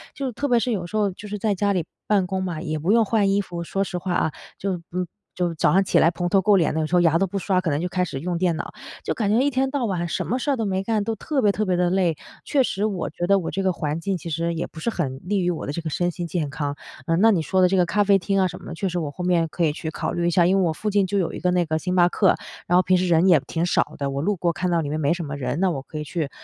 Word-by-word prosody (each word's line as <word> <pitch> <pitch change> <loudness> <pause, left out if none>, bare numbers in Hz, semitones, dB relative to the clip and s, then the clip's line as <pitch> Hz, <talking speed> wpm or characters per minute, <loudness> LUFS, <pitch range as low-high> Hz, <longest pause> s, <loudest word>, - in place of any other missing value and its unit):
就 270 -2 -3
特 285 +5 -2
别 245 -3 +4
是 245 +1 -1
有 185 -6 -2
时 215 - -3
候 205 -2 +2
就 205 +3 -10
是 210 0 -4
在 210 +1 0
家 200 +1 +1
里 180 -5 0 0.2
办 200 -3 +3
公 190 +1 -2
嘛， 175 -4 -3
也 155 -3 -3
不 170 +6 +1
用 225 0 +5
换 210 -2 +2
衣 200 +1 +2
服， 175 -3 -6
说 195 +3 -1
实 185 -2 -4
话 180 0 -2
啊， 160 - +1 0.3
就， 185 -3 -3
嗯， 180 0 -2 0.3
就 175 -2 0
早 150 - +2
上 195 +4 +4
起 - - +3
来 165 - +5
蓬 175 0 -2
头 195 +2 +3
垢 200 +1 +4
脸 165 - +2
的， 160 - 0
有 155 - -1
时 170 - 0
候 175 - +5
牙 165 -1 +4
都 195 - +2
不 195 +2 -4
刷， 185 -1 +1
可 175 - -1
能 145 - 0
就 175 - -1
开 180 0 0
始 140 -6 -4
用 175 +3 -2
电 175 -1 +1
脑， - - -6 0.3
就 - - 0
感 215 -5 -1
觉 220 - +4
一 275 +3 +3
天 265 0 0
到 275 -4 -1
晚 180 -5 -1
什 - - -2
么 250 - 0
事 285 +3 -1
儿 270 - 0
都 225 - -1
没 190 -1 -1
干， 215 0 0
都 225 - -1
特 275 +5 -1
别 210 - +4
特 215 - -1
别 185 -3 +1
地 180 0 +2
累， 175 -4 +1 0.3
确 285 - +2
实 210 -5 -1
我 195 -5 -2
觉 175 +3 -3
得 195 +2 +4
我 175 - -4
这 195 - -2
个 190 - +2
环 155 -2 -3
境 195 +1 -1
其 170 - -7
实 170 +2 -1
也 165 - -3
不 160 - -11
是 235 - 0
很 140 - -3
利 200 +3 0
于 180 -1 +1
我 170 - -3
的 - - -3
这 170 - -4
个 160 - -4
身 175 +3 0
心 175 0 -5
健 165 -3 -2
康。 145 0 -3 0.3
呃， 165 - +2
那 225 +5 +5
你 185 -6 +2
说 185 +4 +1
的 180 - +5
这 190 - +2
个 180 - +4
咖 205 +4 +2
啡 200 -1 +4
厅 195 +2 -1
啊 190 - +3
什 180 0 -8
么 - - -14
的， - - -6
确 195 +3 -2
实 175 0 -2
我 150 -4 -3
后 180 - -6
面 175 -2 +2
可 170 +2 -3
以 155 - +3
去 160 +1 -5
考 - - -3
虑 170 0 0
一 - - +4
下。 175 0 +4
因 190 +3 +3
为 - - +3
我 160 - 0
附 210 +7 -3
近 200 -2 +2
就 200 - -1
有 180 -4 0
一 - - -6
个 180 - +1
那 180 -1 +2
个 155 0 -1
星 180 +2 -2
巴 175 -1 +5
克， 190 +1 +3 0.3
然 175 - +2
后 185 - +4
平 185 0 +3
时 180 +1 0
人 170 +1 +4
也 170 -4 +6
挺 165 +1 -1
少 175 - 0
的， 140 -1 -2
我 140 +1 -2
路 205 +6 +1
过 175 -1 0
看 180 +2 -2
到 170 -1 +2
里 145 - -4
面 155 +2 -2
没 145 +1 +2
什 175 0 -4
么 145 -1 -5
人， 130 +2 -2
那 190 - +3
我 140 -5 -3
可 155 - -9
以 - - -3
去 150 -1 -3
180 Hz, 370 characters per minute, -23 LUFS, 165-195 Hz, 0.3 s, 也